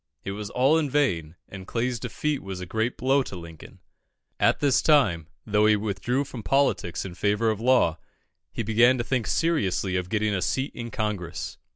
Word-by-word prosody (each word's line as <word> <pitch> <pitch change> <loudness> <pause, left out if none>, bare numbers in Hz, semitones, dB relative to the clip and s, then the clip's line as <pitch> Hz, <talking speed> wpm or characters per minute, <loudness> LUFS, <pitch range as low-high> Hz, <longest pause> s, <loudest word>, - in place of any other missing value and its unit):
It 100 - -4
was 105 +1 -5
all 135 +8 +3
in 150 -3 -1
vain, 90 - 0
and 95 -1 -10
Clay's 120 +1 -1
defeat 140 +4 -2
was 95 -1 -6
a 90 - -5
great 110 +6 -2
blow 135 +2 +2
to 110 - -6
Lincoln. 85 -3 -11 0.6
At - - +3
this 140 -3 +3
time, 105 - +3 0.2
though 105 0 +3
he 110 - +5
withdrew 105 +6 -1
from 130 -4 -8
politics 135 -10 0
in 95 - -7
favour 105 +4 +1
of 110 0 -4
law, 120 -10 +3 0.5
he 115 - -3
began 115 +4 +4
to 120 - -1
think 125 -1 -1
seriously 100 - 0
of 90 -1 -2
getting 110 0 0
a 95 - -1
seat 130 +7 -1
in 120 -1 -6
Congress. 100 -7 -4
110 Hz, 190 wpm, -25 LUFS, 95-130 Hz, 0.6 s, he